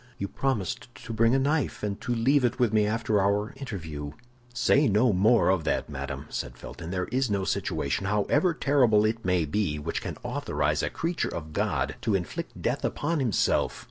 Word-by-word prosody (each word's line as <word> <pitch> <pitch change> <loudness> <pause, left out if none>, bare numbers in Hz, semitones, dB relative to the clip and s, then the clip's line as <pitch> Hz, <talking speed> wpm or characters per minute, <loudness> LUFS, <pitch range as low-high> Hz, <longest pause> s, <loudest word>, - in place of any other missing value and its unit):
"You 100 - -3
promised 115 -6 -2
to 115 - -8
bring 115 +3 +3
a - - +4
knife, 140 -2 0
and 100 -1 -3
to 120 -1 -1
leave 130 +4 +3
it 120 0 +1
with 120 -4 +2
me 105 -1 +3
after 110 -1 +1
our 100 +2 +1
interview." 80 - -6 0.4
"Say 135 +3 +3
no 110 +3 +3
more 105 +5 +4
of 95 -3 +2
that, - - 0
madame," 70 0 -5
said - - -5
Felton. 80 - -8
"There 90 0 -1
is 130 0 +1
no 100 -2 0
situation, 85 +4 -1
however 105 - +2
terrible 125 -9 +3
it 115 +1 -1
may 90 -3 +2
be, 75 -1 -1
which 75 +3 -3
can - - -5
authorize - - -1
a - - -1
creature 165 +1 -2
of 80 -2 -6
God - - -1
to 110 -3 +1
inflict 90 -3 -4
death - - 0
upon 160 +2 -1
himself. 120 -7 +1
105 Hz, 190 wpm, -27 LUFS, 90-125 Hz, 0.4 s, a